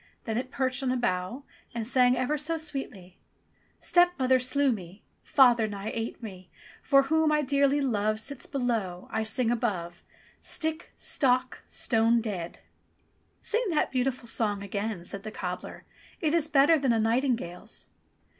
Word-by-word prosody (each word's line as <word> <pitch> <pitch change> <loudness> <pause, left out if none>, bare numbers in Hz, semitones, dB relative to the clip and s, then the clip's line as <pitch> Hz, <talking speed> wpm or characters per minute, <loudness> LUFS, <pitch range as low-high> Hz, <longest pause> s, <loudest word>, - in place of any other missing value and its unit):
Then 225 - -3
it 255 - -5
perched 260 0 -1
on 260 -2 0
a 255 - +1
bough 240 +2 -2 0.3
and 230 -2 -2
sang 250 -1 +4
ever 255 +4 0
so 310 +3 -1
sweetly: 270 - -6 0.6
"Stepmother 285 -8 +3
slew 265 +2 +2
me, 190 -2 -7 0.2
Father 240 -4 +5
nigh 205 0 -5
ate 230 +1 -4
me, 185 -4 -9 0.4
He 275 - +6
whom 315 +2 +2
I 300 0 +2
dearly 280 +1 +2
love 215 -4 0
Sits 280 +3 -4
below, 225 -10 -2
I 220 - 0
sing 225 +2 0
above. 185 -8 -2 0.4
Stick! 320 +1 -2
Stock! 255 -2 +1
Stone 230 0 +2
dead 190 -7 -5 0.4
!" - - -41
"Sing 455 +4 0
that 315 -4 +1
beautiful 255 -1 -1
song 205 -3 -1
again," 200 -2 -4
said 200 - -4
the 215 - -6
cobbler. 180 -3 -6 0.4
"It 310 -2 0
is 330 -2 +2
better 300 +2 +5
than 265 -4 +2
a 225 - +2
nightingale's." 225 -4 -1
245 Hz, 155 wpm, -28 LUFS, 210-275 Hz, 0.6 s, He